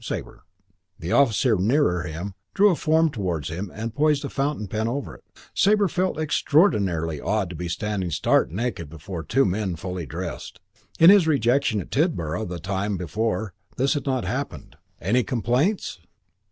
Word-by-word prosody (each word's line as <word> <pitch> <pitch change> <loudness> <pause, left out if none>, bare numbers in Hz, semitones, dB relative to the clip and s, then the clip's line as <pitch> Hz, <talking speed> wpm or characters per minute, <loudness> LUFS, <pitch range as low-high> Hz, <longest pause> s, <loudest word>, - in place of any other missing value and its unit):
"Sabre." - - -6 0.6
The 85 - -5
officer 125 -3 +3
nearer 100 - +2
him 85 +4 -5 0.2
drew 200 +1 +6
a - - +1
form 160 0 +2
towards 90 - -3
him 90 +4 -5
and 110 +2 -5
poised 150 0 +2
a - - -4
fountain 140 -5 -2
pen 110 +3 -2
over 135 +4 -3
it. - - -16 0.3
Sabre 205 0 +3
felt 185 +1 -1
it 155 - -1
extraordinarily 95 - +2
odd 100 -3 -1
to - - -7
be 90 +2 -4
standing 95 +1 -2
stark 80 - +2
naked 95 -4 -3
before 80 +2 -7
two 135 +10 +2
men 95 -1 -1
fully 90 -1 -5
dressed. - - -6 0.4
In 165 +3 +9
his 200 -5 +5
rejection 125 -5 +2
at - - -12
Tidborough 110 - 0
the 90 -2 -5
time 95 +3 -2
before 110 +3 -2 0.2
this 135 +2 +2
had 145 -2 -4
not 130 -2 0
happened. 115 - -5 0.2
"Any 115 +8 +2
complaints?" 125 - 0
110 Hz, 165 wpm, -24 LUFS, 90-140 Hz, 0.6 s, In